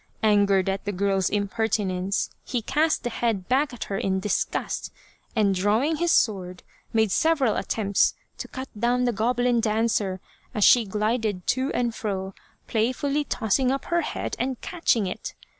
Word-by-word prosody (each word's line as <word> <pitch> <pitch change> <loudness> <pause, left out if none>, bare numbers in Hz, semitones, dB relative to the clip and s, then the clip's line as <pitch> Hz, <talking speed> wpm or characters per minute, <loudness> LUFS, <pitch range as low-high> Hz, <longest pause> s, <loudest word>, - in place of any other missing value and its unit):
Angered 200 -3 +3
at 195 +1 -2
the 205 - -1
girl's 195 -1 +1
impertinence, 200 -2 -1
he 245 -3 -3
cast 305 +6 +1
the 240 - -2
head 220 -6 -1
back 275 +3 +2
at 245 - -5
her 195 - -3
in 190 0 0
disgust, 205 +2 -2 0.4
and 205 -3 +3
drawing 215 - +1
his 345 +1 +1
sword, 185 -5 +1 0.3
made 220 -3 +2
several 295 - +2
attempts 200 -3 +1 0.2
to - - -5
cut 260 0 -7
down 240 +3 +1
the 245 - +2
goblin 245 +2 +1
dancer 215 -4 0 0.4
as 210 - +2
she 240 +1 +6
glided 210 -1 -1
to 260 +2 0
and 240 -2 0
fro 195 -3 -4 0.3
play 225 +2 +1
fully 285 +3 -1
tossing 250 +3 +1
up 275 0 -2
her 345 0 +1
head - - -4
and 255 0 -2
catching 330 - 0
it. 185 - -5
220 Hz, 160 wpm, -25 LUFS, 200-250 Hz, 0.4 s, she